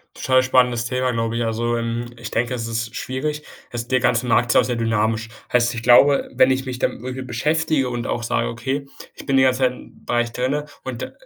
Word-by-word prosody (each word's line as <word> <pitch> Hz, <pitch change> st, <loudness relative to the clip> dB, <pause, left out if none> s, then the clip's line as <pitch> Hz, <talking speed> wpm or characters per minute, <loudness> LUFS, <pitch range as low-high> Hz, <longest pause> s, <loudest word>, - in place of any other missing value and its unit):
Total 130 Hz, 0 st, +3 dB
spannendes 125 Hz, -2 st, +2 dB
Thema, 125 Hz, +1 st, 0 dB
glaube 115 Hz, 0 st, -1 dB
ich. 120 Hz, -, 0 dB
Also, 120 Hz, +1 st, -1 dB
hm, 115 Hz, +1 st, -2 dB
ich 115 Hz, -2 st, -7 dB
denke, 120 Hz, +2 st, 0 dB
es 115 Hz, -2 st, -3 dB
ist 115 Hz, 0 st, -3 dB
schwierig. 150 Hz, +3 st, -3 dB, 0.3 s
Das 120 Hz, 0 st, -4 dB
der 130 Hz, -1 st, +3 dB
ganze 125 Hz, 0 st, +1 dB
Markt 120 Hz, 0 st, +2 dB
ist -, -, +5 dB
sehr 120 Hz, -2 st, -1 dB
dynamisch, 115 Hz, 0 st, 0 dB, 0.2 s
heißt, 120 Hz, 0 st, +2 dB
ich 115 Hz, -, -5 dB
glaube, 135 Hz, +4 st, +5 dB
wenn 130 Hz, -, +4 dB
ich 130 Hz, 0 st, -1 dB
mich 125 Hz, -1 st, -5 dB
damit -, -, -1 dB
wirklich 130 Hz, +1 st, -6 dB
beschäftige 150 Hz, +2 st, 0 dB
und 120 Hz, -1 st, -4 dB
auch 120 Hz, -, -2 dB
sage: 115 Hz, +1 st, 0 dB
„Okay, 130 Hz, +4 st, -3 dB, 0.3 s
ich -, -, -12 dB
bin 135 Hz, -, +1 dB
die 130 Hz, -, +5 dB
ganze 130 Hz, 0 st, +3 dB
Zeit 130 Hz, -1 st, +3 dB
im -, -, -15 dB
Bereich 120 Hz, -1 st, 0 dB
drinnen 130 Hz, +5 st, -1 dB, 0.2 s
und 130 Hz, -3 st, -5 dB
125 Hz, 220 wpm, -21 LUFS, 115-130 Hz, 0.3 s, ist